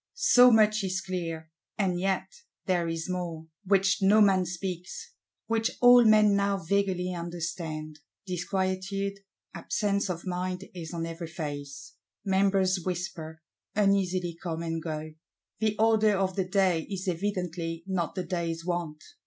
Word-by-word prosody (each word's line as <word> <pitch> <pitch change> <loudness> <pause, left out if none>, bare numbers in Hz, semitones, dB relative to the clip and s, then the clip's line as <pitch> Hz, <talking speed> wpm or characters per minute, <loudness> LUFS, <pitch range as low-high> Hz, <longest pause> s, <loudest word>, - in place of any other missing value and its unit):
So 250 - +6
much 215 -2 +4
is 190 0 -1
clear. 165 -4 -5 0.3
And 185 -4 0
yet 190 +1 0 0.4
there 175 -2 +1
is 165 0 -3
more, 175 -3 -4 0.2
which 195 0 +3
no 200 +3 +5
man 190 -3 +4
speaks, 180 - -6 0.3
which 225 0 +1
all 245 0 +8
men 215 -2 +6
now 200 0 +1
vaguely 185 0 0
understand. 170 -3 -5 0.3
Disquietude, 190 +2 -2 0.3
absence 200 -2 -1
of 170 0 -4
mind 180 +1 -3
is 165 -3 -7
on 165 -1 -3
every 165 0 -6
face; 145 -4 -7 0.3
Members 190 -1 +2
whisper, 165 -3 -5 0.3
uneasily 185 -4 +1
come 165 -2 -4
and 165 -1 -3
go: 155 -1 -5 0.5
the 215 -1 +1
order 220 -1 +4
of 190 -1 0
the 190 -2 0
day 185 -4 +1
is 195 -1 -5
evidently 175 -3 -2
not 185 -4 -2
the 185 - -2
day's 165 -2 -3
want. 170 -4 -3
185 Hz, 135 wpm, -28 LUFS, 170-195 Hz, 0.5 s, all